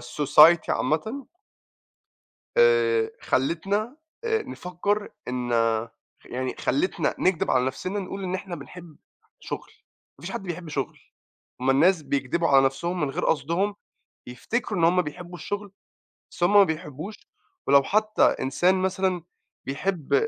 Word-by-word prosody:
الsociety 150 +6 +5
عامةً 220 - -1 1.3
آآ 455 -2 +4
خلّتنا 195 - -1 0.3
آآ، 445 -1 +1
نفكّر 200 - -3 0.2
إن 125 -1 -3 0.7
يعني 130 +1 -4
خلّتنا 355 +6 0
نكدب 185 -3 +1
على 125 -1 +3
نفْسنا 185 +10 -3
نقول 195 +1 -6
إن 185 0 -3
إحنا 185 -2 -5
بنحب 170 -4 -12 0.4
شغل، - - -6 0.5
ما - - -14
فيش 185 - -5
حد 195 - -4
بيحب 175 -2 -6
شغل، 140 -3 -4 0.6
هُم 130 +1 +2
الناس 160 +5 +4
بيكدبوا 140 +4 -1
على 135 -1 +6
نفْسهم 170 +7 -2
من 145 - 0
غير - - -3
قصدهم، 170 +8 0 0.5
بيفتكروا 200 - -3
إن 165 - +4
هُم 180 +2 +4
بيحبوا 175 +3 -8
الشغل، 205 +1 -5 0.6
بس - - -4
هُم 175 +4 +3
ما 205 -1 +9
بيحبوش، 160 +3 -5 0.5
ولو 140 0 +6
حتّى 215 +6 +1
إنسان 175 +8 +2
مثلًا 185 -1 0 0.4
بيحب 155 +4 0
175 Hz, 130 wpm, -25 LUFS, 145-200 Hz, 1.3 s, ما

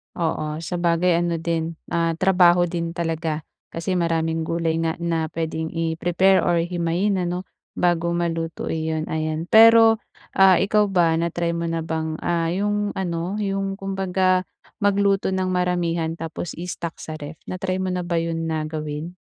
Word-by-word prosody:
Oo, 160 -2 -2
sabagay 170 0 +1
ano 170 -1 0
din, 165 0 -2 0.2
ah, 165 -1 +1
trabaho 180 -1 +4
din 170 -1 -3
talaga. 160 -2 -2 0.2
Kasi 180 +2 -2
maraming 165 -1 0
gulay 165 -1 0
nga 165 -1 0
na 165 -2 0
puwedeng 160 0 -3
i-prepare 175 +3 +2
or 170 -1 +2
himayin 175 +3 0
ano 180 +1 -2 0.3
bago 170 -1 +1
maluto 165 -1 -2
iyon, 160 0 -2
ayan. 155 0 -2
Pero, 225 0 +7 0.4
ah, 190 -1 +7
ikaw 210 +2 +2
ba 175 -4 +3
na-try 170 0 -1
mo 170 0 -2
na 165 0 -2
bang, 160 -1 -3
ah, 170 -1 0
'yung 205 +3 -1
ano, 175 +1 -2
'yung 195 -1 -2
kumbaga 190 -1 0 0.3
magluto 200 -1 +2
ng 185 0 0
maramihan 175 -2 0
tapos 165 0 -6
i-stock 170 -1 -5
sa 155 -1 -7
ref? 150 +2 -7
Na-try 185 0 -3
mo 185 -1 -2
na 180 - -1
ba 175 - -1
'yun 165 0 -2
na 155 -1 -1
gawin? 155 +2 -5
170 Hz, 150 wpm, -23 LUFS, 165-185 Hz, 0.4 s, Pero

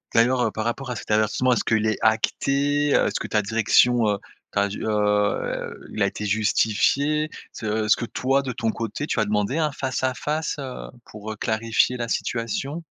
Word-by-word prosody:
d'ailleurs, 125 +2 +4
heu, - - +2
par 110 0 -4
rapport 130 +2 -3
à 125 - -3
cet 105 - -6
avertissement, 110 +4 +2
est-ce - - 0
qu'il 110 -1 +1
est 110 -2 0
acté, 140 +6 +2
heu, - - +4
est-ce - - -1
que - - -4
ta 105 -1 +1
direction, 115 +2 +3
heu, 100 - +1 0.3
t'a 100 0 +1
di 100 - -6
heu 105 -1 0
il - - -5
a - - +4
été 105 - -5
justifié, 110 +9 +2 0.2
se 110 0 -2
est-ce 105 - +5
que 120 - -4
toi 135 +3 +1
de 130 -2 -4
ton 115 -2 -1
côté 115 +7 -4
tu 120 - -1
as 110 - +2
demandé 105 +8 0
un 155 -2 +1
face 130 -2 -3
à 130 -1 +1
face, 155 +1 -2
heu, 130 -2 -6 0.2
pour, 105 0 -8
heu, - - -5
clarifier 115 +3 +1
la 120 -1 -3
situation? 130 +8 -2
115 Hz, 205 wpm, -24 LUFS, 105-135 Hz, 0.3 s, est-ce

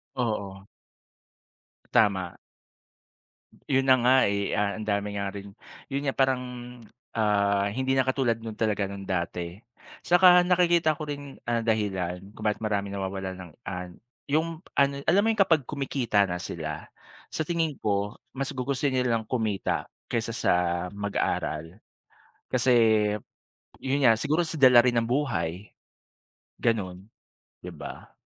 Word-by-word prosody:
Oo. 100 -5 -3 1.3
Tama. 95 -5 +2 1.3
Ayun 135 -1 +2
na 130 -1 +6
nga 125 +2 +5
eh. 100 0 0
Ang 105 +1 -1
dami 100 -1 0
nga 100 0 -2
rin 100 0 -8 0.4
yun 140 0 -1
nga 135 - 0
parang, 130 -1 +2 0.7
ah, 100 -2 +2
hindi 130 +5 -1
na 130 - +3
katulad 130 -4 +1
nung 110 -1 -7
talaga 105 -3 0
nung 100 0 -7
dati 85 -1 -3 0.3
at - - -18
saka 180 0 +7
nakikita 175 -3 +3
ko 155 - -8
rin 145 -2 -6 0.2
ang 115 -1 0
dahilan 95 -5 -1
kung 110 0 -6
bakit 105 +1 0
maraming 100 -2 -1
nawawalan 95 -1 -4
ng 90 -2 -10 0.2
ano 90 -2 -6 0.3
yung 160 +2 0 0.2
ano 140 0 +2
alam 175 +7 +4
mo - - +3
yung 210 - +4
kapag 160 -8 +2
kumikita 135 -7 0
na 90 - -2
sila, 80 -3 -5 0.4
sa - - -3
tingin 165 -1 -1
ko 100 -1 0 0.2
mas 135 +1 -4
gugustuhin 130 +1 -1
nilang 120 -3 +1
kumita 110 -5 -1 0.2
kaysa - - -2
sa - - +1 0.4
mag-aral 100 -3 -2 0.7
kasi 130 0 +2 1.1
yun 135 +1 0
nga 115 -3 +5
siguro 155 +6 +1
sa 160 -1 -4
dala 125 -3 +8
rin 120 -1 +3
ng 115 - -2
buhay, 105 - -2 0.9
ganun 95 -6 -1 0.5
diba? - - -9
115 Hz, 135 wpm, -27 LUFS, 100-135 Hz, 1.3 s, dala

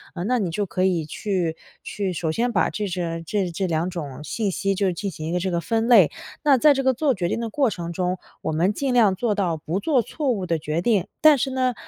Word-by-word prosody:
呃， 175 - -3
那 250 +4 +1
你 195 -5 -1
就 205 +4 -1
可 185 +1 -1
以 175 -4 +1
去 175 -2 -2 0.3
去 195 -3 -3
首 165 -1 -2
先 240 +9 0
把 - - +2
这 210 -1 -3
这 175 +1 -2
这 190 +3 -1
2 165 +1 0
种 150 -6 -6
信 205 +5 -2
息 195 +2 0
就 190 -1 +1
进 200 +3 -4
行 155 -2 -6
一 - - -3
个 180 - 0
这 190 +2 -1
个 170 - 0
分 225 +6 0
类。 215 -10 +6 0.3
那 285 -3 +5
在 295 +4 +6
这 270 0 -1
个 260 0 +3
做 275 +2 +1
决 180 -3 -1
定 180 - -2
的 230 -1 -3
过 270 +2 +1
程 170 -4 -5
中， 180 +1 -1 0.3
我 - - -1
们 170 +5 +2
尽 270 +3 -1
量 215 -6 +4
做 220 +2 0
到 180 -5 0
不 160 +4 -3
做 270 +2 +2
错 290 +5 -3
误 200 -6 -2
的 165 -2 0
决 155 +2 -2
定。 200 -2 +1
但 310 -2 +7
是 265 +1 -1
呢， 255 -1 +1
190 Hz, 270 characters per minute, -23 LUFS, 170-235 Hz, 0.3 s, 但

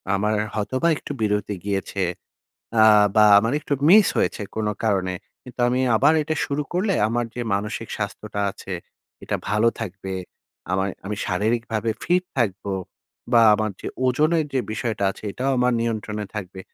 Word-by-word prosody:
আমার 105 +2 +1 0.2
হয়তোবা 130 +9 0
একটু - - -8
বিরতি 105 -1 0
গিয়েছে 100 -1 -2 0.8
আ 110 - +8 0.3
বা, 105 - +7
আমার 115 +4 0
একটু 145 - -1
মিস 205 +2 +8
হয়েছে - - 0
কোনো 105 -1 0
কারণে। 95 -3 +1 0.3
কিন্তু 125 -1 -10
আমি 125 +1 +1 0.2
আবার 150 - +5
এটা 155 +1 -2
শুরু 145 +1 -1
করলে 190 +2 +1
আমার 120 +1 0
যে 125 - -4
মানসিক 105 +3 -3
স্বাস্থ্যটা 105 0 -4
আছে, 95 0 -9 0.5
এটা - - -1
ভালো 105 +3 +3
থাকবে, 95 -2 -5 0.6
আমায় 95 +1 0
আমি 105 - -3
শারীরিকভাবে 110 +3 0
ফিট 180 +1 +2 0.2
থাকবো 100 -4 -1 0.6
বা, 115 - +7
আমার 110 0 -1
যে - - -7 0.2
ওজনের 155 +5 +2
যে 130 - +3
বিষয়টা 110 -3 -2
আছে, - - -11
এটাও 135 +2 -1
আমার 125 0 +3
নিয়ন্ত্রণে 110 -2 -2
থাকবে। 95 -1 -6
110 Hz, 155 wpm, -23 LUFS, 100-125 Hz, 0.8 s, আ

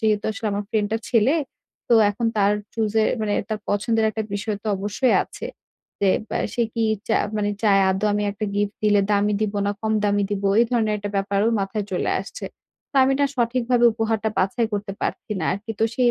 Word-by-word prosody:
যেহেতু 215 -2 +1
আসলে 220 0 -5
আমার 205 0 -2
friend 210 -2 +1
টা - - +2
ছেলে 240 +5 +3 0.5
তো 235 - +5 0.2
এখন 230 +3 -2
তার 205 0 +4 0.2
choose 220 -2 -1
এ - - +3 0.2
মানে 210 -1 -1 0.2
তার 215 -1 -2
পছন্দের 220 +2 +1
একটা 220 +1 -3
বিষয় 210 0 -2
তো - - -9
অবশ্যই 205 +6 +1
আছে। - - -8 0.5
যে 195 -2 +4 0.2
বে - - -1 0.2
সে 240 - +1
কি 230 -1 +1 0.2
চায় 220 - +2
মানে 205 0 0
চায় 200 -2 +5
আদৌ 195 +3 0
আমি 210 - 0
একটা 215 +1 -4
gift 205 0 0
দিলে 210 -1 +4
দামি 205 0 +2
দিব 210 -1 -1
না - - +2
কম 220 0 -1
দামি 205 0 +2
দিব 200 -1 -2 0.2
এই - - +5
ধরনের 220 -3 +1
একটা 205 0 -5
ব্যাপারও 200 +2 +1
মাথায় 200 +1 -2
চলে 180 - 0
আসছে। 200 - -8 0.5
তো - - -60
আমি 270 - +2
না - - +5
সঠিকভাবে 240 0 +1
উপহারটা 220 0 -1
বাছাই 225 +5 +1
করতে 205 -1 -3
পারছি - - -3
না - - -1
আরকি। 210 +4 -6
তো - - +5
সেই 245 -2 +3
210 Hz, 210 wpm, -23 LUFS, 205-225 Hz, 0.5 s, তো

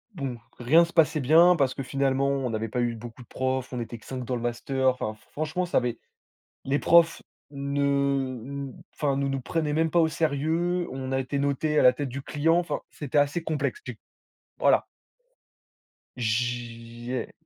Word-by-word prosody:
bon, 135 -6 -4 0.2
rien 155 +8 +5
se 170 - -4
passait 155 -2 +3
bien 165 +6 +6
parce 135 -5 +1
que 135 - -5
finalement 135 0 0
on 135 -3 -1
n'avait 110 0 -2
pas 120 +3 -2
eu 120 -1 0
beaucoup 115 +2 -10
de - - -23
profs, 130 0 -2
on 125 - -4
était 120 0 -5
que 110 - -19
5 130 -1 -5
dans 125 +1 -2
le 120 - -4
master, 130 +2 0
enfin 110 -4 -2
f 110 - -22
franchement 155 +4 -2
ça 175 - 0
avait 120 -1 0 0.7
les 140 +2 +1
profs 170 -1 +4 0.3
ne 140 0 -3 0.9
n 130 - -13
enfin 140 -2 0
nous 140 0 0
nous 135 0 -2
prenaient 150 +3 -1
même 160 +1 +1
pas 170 - +2
au 160 - +5
sérieux, 165 +3 0
on 130 0 -5
a 135 - +1
été 135 +2 -2
notés 145 +2 +1
à - - +4
la 125 - +7
tête 140 +2 -4
du 140 +2 -6
client, 155 +4 +1
enfin 175 0 -1
c'était 145 -1 -2
assez 145 +4 +2
complexe 160 - -2
si - - -6
tu - - -28 0.6
voilà. - - +4 1.3
J'ai 120 +1 -3
135 Hz, 190 wpm, -26 LUFS, 125-155 Hz, 1.3 s, la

